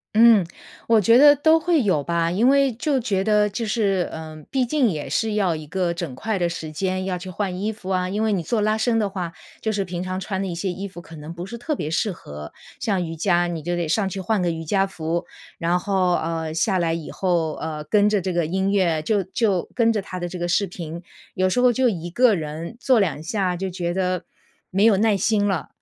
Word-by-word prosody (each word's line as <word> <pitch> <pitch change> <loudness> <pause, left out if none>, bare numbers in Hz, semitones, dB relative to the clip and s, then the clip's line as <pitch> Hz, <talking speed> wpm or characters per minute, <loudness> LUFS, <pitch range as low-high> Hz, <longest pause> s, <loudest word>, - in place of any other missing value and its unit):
嗯， 225 -3 +7 0.4
我 225 -1 +5
觉 230 +4 +5
得 290 +1 +8
都 315 +3 +4
会 330 -3 +2
有 185 -9 +1
吧， 170 +2 0
因 220 +7 +3
为 275 -1 +4
就 270 +4 0
觉 205 -6 0
得 210 0 +3
就 205 +4 -4
是， 200 -5 0
嗯， 155 -1 -8
毕 260 -2 +1
竟 265 -1 +2
也 155 -4 -4
是 220 -2 0
要 195 -5 +1
一 155 -1 -7
个 175 0 -1
整 165 -7 -5
块 220 +7 -2
的 175 -2 +1
时 160 -2 -6
间 185 +3 -2
要 185 -1 -2
去 185 +1 -7
换 185 -1 -3
衣 210 +2 0
服 205 -3 -10
啊， 185 -1 0
因 210 +3 -1
为 220 - +1
你 190 -4 0
做 215 +7 0
拉 215 +1 +2
伸 225 +1 +1
的 210 -2 +1
话， 180 -4 -4 0.3
就 220 - -1
是 200 -2 -1
平 180 -1 -4
常 185 0 -3
穿 190 0 -3
的 195 - -2
一 175 - -4
些 190 +3 -2
衣 195 +3 -5
服 185 -2 -10
可 165 - -13
能 155 +1 -8
不 170 +1 -7
是 230 +4 -7
特 290 +5 -3
别 150 - -3
适 170 +6 0
合， 75 - -9 0.3
像 195 -6 0
瑜 165 - -5
伽， 175 +1 +2
你 170 -2 -4
就 175 +2 -2
得 170 - -1
上 190 +5 +1
去 190 +1 -5
换 200 +1 0
个 175 - +1
瑜 165 0 -4
伽 195 +4 +2
服， 170 -3 -3 0.3
然 170 +2 +1
后， 185 -1 +1
呃， 165 -1 -2
下 185 +3 +1
来 165 -1 +1
以 165 -2 -5
后， 170 -4 0
呃， 155 -1 -4
跟 205 +6 +3
着 210 -1 +2
这 185 0 -2
个 170 -2 +1
音 190 +4 0
乐 175 -6 +2
就 205 +5 +1
就 190 -1 0
跟 230 -2 +4
着 210 -3 -1
它 185 -1 -7
的 175 0 -3
这 180 0 -7
个 175 - -1
视 200 +3 +2
频， 170 -2 -7 0.3
有 185 0 +2
时 215 +7 +1
候 250 0 +5
就 255 +2 +2
一 175 -5 -3
个 240 +4 +4
人， 160 +4 -5
做 255 -2 +4
两 170 -7 0
下 185 +1 -1
就 190 +2 -3
觉 175 -1 -3
得 185 -1 -1 0.5
没 195 +2 +2
有 225 -3 +6
耐 210 +1 +3
心 205 +1 +2
了， 190 -5 -1
185 Hz, 265 characters per minute, -23 LUFS, 170-215 Hz, 0.5 s, 得